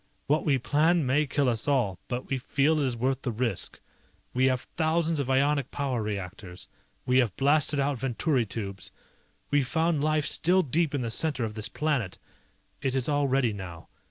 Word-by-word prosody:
What 150 +2 +1
we 140 -2 +4
plan 155 +5 +2
may 145 +4 +2
kill 140 0 +1
us 115 0 0
all, 120 -10 +1
but 125 +1 -4
we 135 - -1
feel 145 +5 +1
it 145 - +1
is 120 -2 -1
worth 130 +3 0
the 125 - -2
risk. 115 -4 -2 0.5
We 130 +1 +2
have 130 -1 +1
thousands 165 -1 +1
of 135 -2 -2
ionic 140 0 +2
power 135 -5 -2
reactors. 95 -3 -5 0.4
We 125 +1 +4
have 115 -8 0
blasted 145 +1 +3
out 140 -2 0
Venturi 130 0 0
tubes. 100 -2 -6 0.6
We 145 0 +4
found 160 +2 0
life 155 -1 +1
still 185 +4 +3
deep 155 +1 0
in 140 - -1
the 115 - -3
center 140 -1 +1
of 110 - -5
this 110 -1 -3
planet. 140 -9 -1 0.6
It 135 -2 -1
is 130 -2 0
all 145 -1 +2
ready 130 -4 +2
now. 90 -5 -8
135 Hz, 185 wpm, -27 LUFS, 120-150 Hz, 0.6 s, we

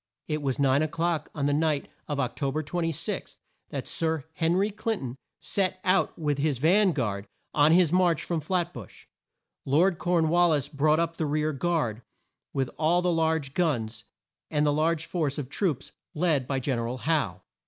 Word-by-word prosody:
It 150 -1 -2
was 135 -3 -1
nine 140 0 +3
o'clock 165 0 -1
on 145 -2 -1
the 145 - +2
night 155 -1 +1 0.2
of 145 -2 -2
Oc 125 -3 -1
to 140 -2 0
ber 155 +3 -2
26, 165 +4 -3 0.3
that - - -5
Sir 160 -4 -1
Hen 165 +1 +1
ry 200 +3 +2
Clin 220 +2 -2
ton 125 -2 -5 0.2
set 185 +5 -1
out 185 +1 +2
with 150 -3 -1
his 145 -2 +1
van 185 - +4
guard, 100 -8 -2 0.3
on 150 +1 +5
his 175 -1 +5
march 180 -3 +3
from 170 -3 -2
Flat 175 +2 -1
bush. 115 -7 -11 0.6
Lord 170 +6 +3
Corn 170 -3 +2
wal 175 +1 +4
lis 150 -4 +1
brought 155 +2 +2
up 165 0 -1
the 160 - -1
rear 155 +1 0
guard 135 -7 -1 0.5
with 135 -2 -1
all 170 +3 +3
the 180 -1 +2
large 160 -4 0
guns, 120 -10 -1 0.5
and 150 -1 +1
the 145 - +3
large 160 +1 +1
force 155 -6 -1
of 140 -4 -4
troops 150 - -1 0.2
led 150 -6 +1
by 135 -1 0
Gen 130 -2 -1
er 115 - -2
al 125 +2 -3
Howe. 130 - -1
155 Hz, 190 wpm, -27 LUFS, 140-170 Hz, 0.6 s, on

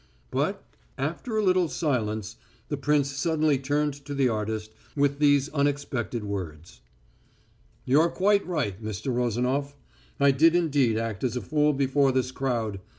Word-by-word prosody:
But, - - -1 0.3
after 230 -4 -3
a 215 - +2
little 185 -2 +3
silence, 110 - -2 0.3
the 145 - -1
prince 145 0 +1
suddenly 150 0 +1
turned 145 +2 0
to 145 0 -5
the 135 -2 +2
artist 110 0 -3 0.2
with 140 0 +1
these 145 -2 +4
unexpected 140 -6 -1
words: 90 -6 -6 1.0
"You're 150 +6 +4
quite 200 +3 +2
right, 115 - -2
Mr. 110 +4 -3
Rozanof. 125 +4 -1 0.4
I 140 0 +5
did 160 +5 +4
indeed 145 -9 +2
act 110 -3 -3
as 125 -2 0
a - - -3
fool 150 -1 +2
before 135 0 +2
this 130 -1 0
crowd. 120 -7 -2
135 Hz, 145 wpm, -26 LUFS, 115-150 Hz, 1.0 s, I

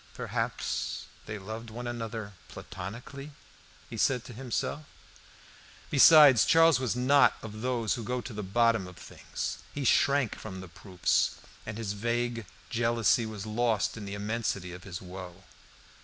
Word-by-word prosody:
"Perhaps - - -3 0.2
they 105 - -4
loved 110 +3 -7
one 120 +2 -7
another 115 -3 -5
platonically," 120 - -8 0.5
he - - -8
said 125 -3 +2
to 125 - -9
himself. 130 +4 -3 1.1
Besides, 145 -3 +8
Charles 165 -4 +5
was 130 -3 -1
not 135 +3 +4
of 110 0 -7
those 120 -3 0
who 120 - -4
go 125 +3 -2
to 120 - -7
the 105 - -4
bottom 110 0 +2
of 90 - -12
things; - - -6
he 145 - -4
shrank 140 -1 +3
from 95 -3 -8
the 95 - -8
proofs, 90 +1 0 0.3
and 110 0 -5
his 110 -3 -3
vague 120 +1 -2 0.2
jealousy 115 -1 +2
was 105 -2 -6
lost 110 0 0
in 110 -2 -7
the 100 0 -5
immensity 100 -3 -3
of 90 - -11
his 90 -2 -7
woe. 90 0 -9
115 Hz, 150 wpm, -29 LUFS, 100-120 Hz, 1.1 s, Besides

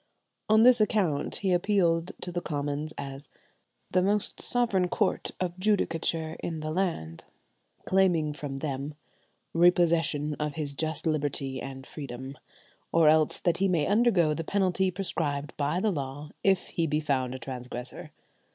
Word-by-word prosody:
On 220 +1 +6
this 245 -2 +6
account 185 -9 +1
he 195 -2 +1
appealed 175 -2 +2
to 180 - -4
the 175 0 -2
Commons 145 0 -3
"as 140 0 -7 0.6
the 185 - +3
most 205 +2 0
sovereign 230 -7 +1
Court 205 +2 0
of 180 0 -3
Judicature 165 -5 0
in 160 -2 -4
the 155 0 -3
land," 155 - -2 0.6
claiming 175 -6 +2
from 145 -2 -5
them, 140 0 -4 0.6
"repossession 165 -3 +3
of 150 -1 -2
his 150 -3 -3
just 155 +3 -1
liberty 145 -4 -1
and 135 -1 -7
freedom, 135 -2 -7 0.6
or 165 -2 +5
else 155 0 +3
that 175 - +2
he 195 - +2
may 170 -5 +2
undergo 200 -7 +3
the 165 - -3
penalty 190 +1 +1
prescribed 155 -6 -2
by 150 +4 0
the 215 +2 +1
law 145 -1 -5
if 190 -2 +3
he 165 -1 0
be 150 +1 +1
found 130 -4 -1
a - - -4
transgressor." 125 0 -7
160 Hz, 150 wpm, -28 LUFS, 145-185 Hz, 0.6 s, On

